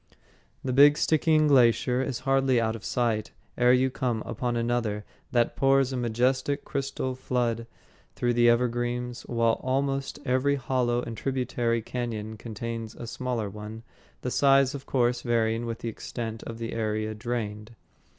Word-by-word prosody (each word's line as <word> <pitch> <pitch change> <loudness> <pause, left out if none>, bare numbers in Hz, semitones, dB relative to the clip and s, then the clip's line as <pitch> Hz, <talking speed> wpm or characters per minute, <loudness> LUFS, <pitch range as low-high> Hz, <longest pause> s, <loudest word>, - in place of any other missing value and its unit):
The 130 - -1
big 145 +2 +7
Stickeen 155 0 +3
Glacier 125 -2 +4
is 130 -2 -3
hardly 135 -2 +3
out 110 -1 0
of 110 - -9
sight 115 -3 -1 0.2
ere 125 0 +4
you 130 +1 +3
come 120 -4 -1
upon 120 +2 -2
another 115 -3 -1 0.3
that 120 -1 +2
pours 135 -1 +3
a - - -2
majestic 130 +4 0
crystal 135 -2 -2
flood 120 -2 -1 0.5
through 120 0 +1
the 120 0 +5
evergreens, 120 0 0
while 115 -1 +1
almost 135 +1 -1
every 130 +2 +2
hollow 125 -2 0
and 115 - -5
tributary 120 -2 -1
cañon 110 -3 -4
contains 115 0 -5
a - - -7
smaller 120 -2 -3
one, 105 +3 -8 0.4
the 125 - -3
size, 135 0 +4
of 140 -1 -8
course, 120 -2 +1
varying 115 -1 0
with 115 -1 -3
the 115 - -4
extent 115 0 -6
of 115 - -6
the 115 0 -5
area 110 -1 -1
drained. 105 -1 -4
120 Hz, 150 wpm, -27 LUFS, 115-130 Hz, 0.5 s, big